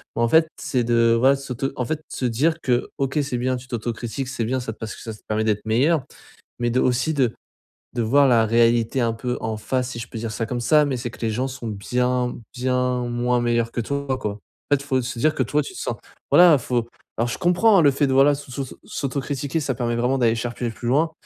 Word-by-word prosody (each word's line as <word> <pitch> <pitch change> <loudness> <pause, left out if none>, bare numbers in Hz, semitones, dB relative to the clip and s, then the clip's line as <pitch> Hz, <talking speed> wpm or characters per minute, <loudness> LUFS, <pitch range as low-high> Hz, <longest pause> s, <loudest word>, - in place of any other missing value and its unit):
ben - - -1
en - - +3
fait, 160 +4 +5
c'est 135 -6 0
de 115 0 +3
voilà 135 +3 +5
de - - -8
s'auto 135 0 -3
en 125 - -1
fait 155 +5 -3
se 130 - -3
dire 145 +8 +1
que 125 -1 0
OK, 135 +2 0
c'est 130 -3 -3
bien 130 +1 0
tu 125 +1 -11
t'autocritiques, 120 +1 -4
c'est 120 -3 -2
bien 130 +3 -1
ça 115 -2 -5
te - - -21
parce 110 -1 -6
que - - -12
ça 110 - -6
te 105 - -14
permet 110 0 0
d'être 105 -1 0
meilleur 130 +7 +2 0.6
mais 120 0 +1
de 125 - +1
aussi 125 +5 +1
de 125 -5 +2 0.6
de 120 - -1
voir 140 +6 +4
la 115 -2 +4
réalité 115 +2 +3
un 115 - +1
peu 125 +2 -3
en 110 -1 -2
face 125 +3 -2
si 120 - -6
je 115 - -7
peux - - -10
dire 115 -1 -4
ça 115 +1 -2
comme 120 +2 -3
ça 150 +4 +5
mais 135 -2 -1
c'est 120 0 -4
que - - -14
les 115 - 0
gens 125 +4 -1
sont 130 -3 -7
bien 125 +4 -1 0.2
bien 125 0 0
moins 120 +1 +1
meilleurs 120 -1 +1
que 120 - -2
toi, 140 +1 -2
quoi. 105 - -3
En 105 - -19 0.4
fait, 140 - -8
il - - -13
faut 130 -2 +1
se 120 0 -5
dire 155 +5 +2
que 130 - 0
toi 145 +6 +1
tu - - -9
te - - -8
sens - - -3 0.3
voilà 175 -3 +8
faut 120 -1 -2 0.3
alors 120 +1 +1
je - - -3
comprends 185 +2 +4
le 145 - +6
fait 140 +1 +1
de 130 - 0
voilà 140 +2 +6
de 140 - -2
sussoss 135 -1 -6
s'autocritiquer 140 +2 -3
ça 135 -3 -1
permet 120 0 -1
vraiment 125 +3 +1
d'aller 115 -2 +3
chercher 120 +1 -3
plus 120 +1 -6
loin 155 +6 +2
125 Hz, 255 wpm, -23 LUFS, 115-135 Hz, 0.6 s, voilà